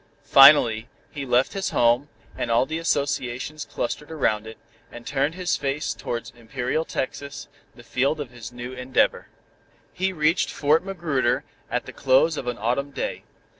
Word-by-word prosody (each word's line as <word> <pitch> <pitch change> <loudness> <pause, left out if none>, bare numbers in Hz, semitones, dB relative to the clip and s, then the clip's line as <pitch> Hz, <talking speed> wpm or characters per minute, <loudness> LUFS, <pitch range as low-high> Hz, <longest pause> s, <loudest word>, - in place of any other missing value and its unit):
Finally, 135 -6 +7 0.2
he 140 -2 -6
left 125 +1 +2
his 195 -1 -2
home, 120 +4 +2 0.3
and - - -3
all 115 +2 +3
the 160 +3 -3
associations 140 -2 -2
clustered 150 +5 -4
around 110 -8 0
it, 110 - -9 0.3
and 120 0 -10
turned 145 +3 0
his 180 -1 0
face 140 +2 -2
towards 115 -2 -5
imperial 125 +5 -2
Texas, 140 -1 -5 0.3
the 120 - -14
field 135 +6 0
of 140 -4 -5
his 120 -2 -9
new 120 +1 -7
endeavor. 125 +1 0 0.7
He 190 +1 0
reached 155 -2 +1
Fort 155 +3 +2
Magruder 155 -10 0 0.3
at - - -2
the - - -9
close 135 +4 +3
of 130 - -5
an 120 - -2
Autumn 125 +6 -1
day. 140 - -4
135 Hz, 160 wpm, -24 LUFS, 120-150 Hz, 0.7 s, Finally